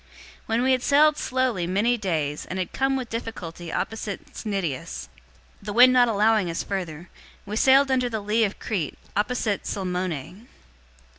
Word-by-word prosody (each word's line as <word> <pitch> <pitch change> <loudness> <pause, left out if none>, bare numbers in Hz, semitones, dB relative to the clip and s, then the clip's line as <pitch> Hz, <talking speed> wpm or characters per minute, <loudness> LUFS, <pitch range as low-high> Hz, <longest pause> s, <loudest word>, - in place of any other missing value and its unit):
027:007 - - -29 0.4
When 225 +1 +1
we 260 - +3
had 255 -1 +2
sailed 295 +3 +5
slowly 250 -11 0
many 205 +7 +2
days, 160 -9 -2
and 185 - -5
had 185 -2 -3
come 270 0 +1
with 255 -3 -4
difficulty 175 -8 -6
opposite 215 -2 -4
Cnidus, 170 - -4 0.5
the 205 0 -5
wind 250 +3 +7
not 250 -1 +5
allowing 215 -3 +2
us 165 - -2
further, 175 -4 -5 0.3
we 205 +1 -5
sailed 270 +3 +5
under 250 -1 +2
the 220 -2 -2
lee 210 +2 +1
of 205 -2 -1
Crete, 185 -9 -3 0.2
opposite 210 -1 -1
Salmone. 180 - -4
210 Hz, 160 wpm, -25 LUFS, 180-245 Hz, 0.5 s, wind